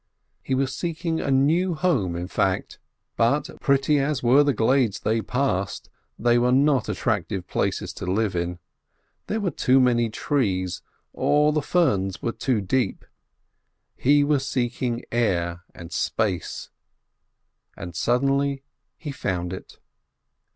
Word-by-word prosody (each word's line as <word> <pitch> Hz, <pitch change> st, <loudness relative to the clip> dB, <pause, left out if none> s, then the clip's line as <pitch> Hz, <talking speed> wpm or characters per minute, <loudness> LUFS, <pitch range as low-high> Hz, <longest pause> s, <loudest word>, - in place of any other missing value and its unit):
He 130 Hz, -, -1 dB
was 135 Hz, 0 st, 0 dB
seeking 165 Hz, 0 st, -2 dB
a -, -, -2 dB
new 160 Hz, +7 st, +2 dB
home, 135 Hz, -, 0 dB
in 85 Hz, +1 st, -4 dB
fact. 95 Hz, 0 st, -1 dB, 0.4 s
But, -, -, +1 dB
pretty 140 Hz, +2 st, +3 dB
as 140 Hz, -1 st, -1 dB
were 130 Hz, +4 st, +6 dB
the 145 Hz, -, +2 dB
glades 120 Hz, -2 st, +1 dB
they 110 Hz, +1 st, +1 dB
passed, 110 Hz, -7 st, -2 dB, 0.3 s
they 120 Hz, +1 st, +3 dB
were 125 Hz, +1 st, +2 dB
not 135 Hz, -2 st, +3 dB
attractive 100 Hz, -3 st, -2 dB
places -, -, -2 dB
to -, -, -5 dB
live 100 Hz, +1 st, 0 dB
in. 85 Hz, 0 st, -2 dB, 0.7 s
There 220 Hz, -, -1 dB
were 195 Hz, -5 st, -1 dB
too 135 Hz, -1 st, +3 dB
many 120 Hz, -2 st, +3 dB
trees, 95 Hz, -8 st, -1 dB, 0.3 s
or 150 Hz, +1 st, +2 dB
the 150 Hz, -, +1 dB
ferns 100 Hz, -, +1 dB
were 120 Hz, -, -2 dB
too 120 Hz, -2 st, -1 dB
deep. 110 Hz, +2 st, -1 dB, 0.9 s
He 145 Hz, +2 st, +4 dB
was 145 Hz, -2 st, +1 dB
seeking 120 Hz, -2 st, -2 dB
air 85 Hz, -7 st, 0 dB
and 85 Hz, 0 st, -10 dB
space, 100 Hz, -6 st, -2 dB, 1.1 s
and 85 Hz, -1 st, -8 dB
suddenly 135 Hz, +6 st, +1 dB, 0.3 s
he 150 Hz, -, -6 dB
found 90 Hz, -9 st, -3 dB
it. 95 Hz, -, -10 dB
125 Hz, 135 wpm, -24 LUFS, 95-140 Hz, 1.1 s, were